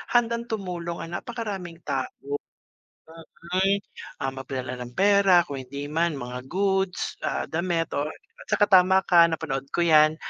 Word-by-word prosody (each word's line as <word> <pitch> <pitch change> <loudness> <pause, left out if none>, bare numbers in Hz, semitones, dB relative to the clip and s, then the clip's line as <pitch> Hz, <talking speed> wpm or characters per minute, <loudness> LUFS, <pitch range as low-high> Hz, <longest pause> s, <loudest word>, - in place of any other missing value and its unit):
handang 235 0 +2
tumulong 180 -5 -4
ang 170 +1 -4
napakaraming 200 -8 -6
tao. 135 -1 -1 1.5
Mm, 195 +1 +3 0.4
ah, 135 - 0
maglala 130 -1 -5
ng 125 0 -7
pera 195 -3 +5
kung 140 - -5
hindi 140 +3 -6
man, 165 0 +1
mga 125 0 -6
goods, 190 +1 0
ah, - - -1
damit 170 0 -1
or, 145 +1 0
ah, 460 +3 -17
'tsaka 205 - +3
tama 190 +1 +6
ka, 170 -1 +6
napanood 150 -5 -3
ko 175 - +2
'yan, 155 -1 +5
170 Hz, 145 wpm, -25 LUFS, 140-195 Hz, 1.5 s, tama